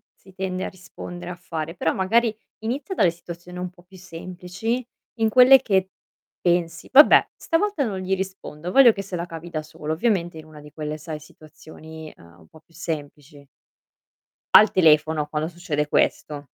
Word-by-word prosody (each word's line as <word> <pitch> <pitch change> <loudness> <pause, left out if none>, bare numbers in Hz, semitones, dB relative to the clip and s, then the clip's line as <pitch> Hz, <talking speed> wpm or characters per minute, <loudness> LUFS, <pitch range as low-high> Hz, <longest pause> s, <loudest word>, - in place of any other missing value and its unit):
si 190 - -20
tende 185 -1 -3
a - - -3
rispondere 180 -1 -9
a - - -6
fare, 165 -1 -6
però 160 -1 0
magari 220 +4 +2 0.3
inizia 265 - -4
dalle 180 -4 +3
situazioni 175 +1 -11
un 180 0 -4
po' 175 -1 -21
più 185 +1 -17
semplici, 180 +7 -5 0.4
in 225 - +3
quelle 255 +3 +7
che 190 -5 +1 0.5
pensi: 175 -2 -1
"Vabbè 295 +3 +7
stavolta 330 -2 0
non 200 -5 -3
gli 190 +1 -1
rispondo, 185 -3 -6
voglio 255 -5 +7
che 195 - -5
se 190 -2 -6
la 170 - -3
cavi 165 0 -9
da 155 -2 -3
solo". 155 0 -7
Ovviamente 175 -4 -1
in 155 - -10
una 155 -1 -14
di 150 0 -14
quelle, 150 0 -5
sai, 155 0 -7
situazioni, 155 +1 -13
ehm, 85 0 -19
un 80 - -20
po' 160 - -18
più 165 - -30
semplici. 145 -2 -7 1.1
Al 215 - +7
telefono 155 -3 +3
quando 155 +1 -3
succede 160 -4 -3
questo. 145 -1 0
175 Hz, 175 wpm, -23 LUFS, 155-190 Hz, 1.1 s, quelle